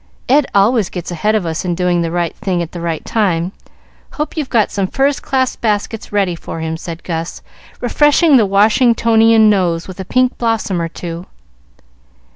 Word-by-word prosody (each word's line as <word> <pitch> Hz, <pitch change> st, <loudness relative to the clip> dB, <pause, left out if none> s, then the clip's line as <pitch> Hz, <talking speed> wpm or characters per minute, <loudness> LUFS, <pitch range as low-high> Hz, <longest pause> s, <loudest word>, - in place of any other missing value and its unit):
"Ed 285 Hz, +2 st, +3 dB
always 205 Hz, 0 st, +3 dB
gets 180 Hz, -1 st, -6 dB
ahead 210 Hz, +6 st, 0 dB
of 210 Hz, -5 st, 0 dB
us 160 Hz, -1 st, -3 dB
in 175 Hz, -2 st, -1 dB
doing 180 Hz, -1 st, +1 dB
the 165 Hz, -, -1 dB
right 170 Hz, -1 st, -2 dB
thing 185 Hz, -5 st, -1 dB
at 165 Hz, -, -8 dB
the 175 Hz, -, -7 dB
right 165 Hz, -2 st, -3 dB
time. 185 Hz, -5 st, 0 dB, 0.6 s
Hope 300 Hz, 0 st, -4 dB
you've 300 Hz, -5 st, -3 dB
got 225 Hz, -4 st, +2 dB
some 195 Hz, -2 st, -1 dB
first 275 Hz, +6 st, 0 dB
class 260 Hz, -2 st, 0 dB
baskets 215 Hz, 0 st, -2 dB
ready 200 Hz, -3 st, +1 dB
for 165 Hz, -1 st, -7 dB
him," 160 Hz, 0 st, -3 dB
said 165 Hz, 0 st, -8 dB
Gus, 165 Hz, -1 st, -5 dB, 0.4 s
refreshing 295 Hz, +5 st, +3 dB
the 225 Hz, -5 st, +4 dB
Washingtonian 225 Hz, +1 st, +4 dB
nose 180 Hz, -5 st, +1 dB
with 185 Hz, 0 st, -10 dB
a 190 Hz, -, -5 dB
pink 255 Hz, +5 st, +1 dB
blossom 225 Hz, -6 st, -1 dB
or 165 Hz, -, -1 dB
two. 170 Hz, +1 st, -7 dB
200 Hz, 180 wpm, -16 LUFS, 170-230 Hz, 0.6 s, the